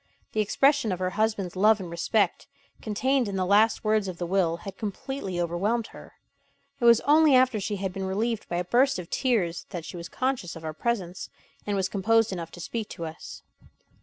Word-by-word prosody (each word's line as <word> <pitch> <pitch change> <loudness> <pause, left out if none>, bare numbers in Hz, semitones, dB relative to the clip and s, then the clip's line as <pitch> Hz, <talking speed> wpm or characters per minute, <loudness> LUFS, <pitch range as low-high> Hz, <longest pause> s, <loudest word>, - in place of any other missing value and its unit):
The 215 - +1
expression 275 +3 +2
of 185 - -1
her 185 0 -2
husband's 210 -3 -1
love 210 +3 +4
and 185 - -6
respect, 170 +6 0 0.3
contained 250 +4 0
in 200 - -4
the 185 -1 0
last 210 +4 +3
words 215 -2 +1
of 180 -2 -5
the 175 - -3
will, 175 -2 +1
had 195 +2 -8
completely 205 -2 -4
overwhelmed 195 +7 0
her. - - -13 0.7
It 240 - 0
was 235 -1 +7
only 300 -1 +5
after 255 -3 +4
she 205 +1 -2
had 190 -1 -3
been 190 0 -4
relieved 220 +3 -2
by 175 - -2
a 175 - -1
burst 260 +8 +3
of 180 -2 -8
tears 205 -10 0
that 175 -4 -6
she - - -7
was 170 -1 -7
conscious 255 -9 -2
of 165 - -10
our 155 - -4
presence, 185 -2 -3 0.4
and 205 - 0
was 190 -1 +1
composed 225 +3 +2
enough 170 -2 -5
to - - -10
speak 220 +5 -4
to 170 - -6
us. 160 0 -9
200 Hz, 205 wpm, -26 LUFS, 180-230 Hz, 0.7 s, was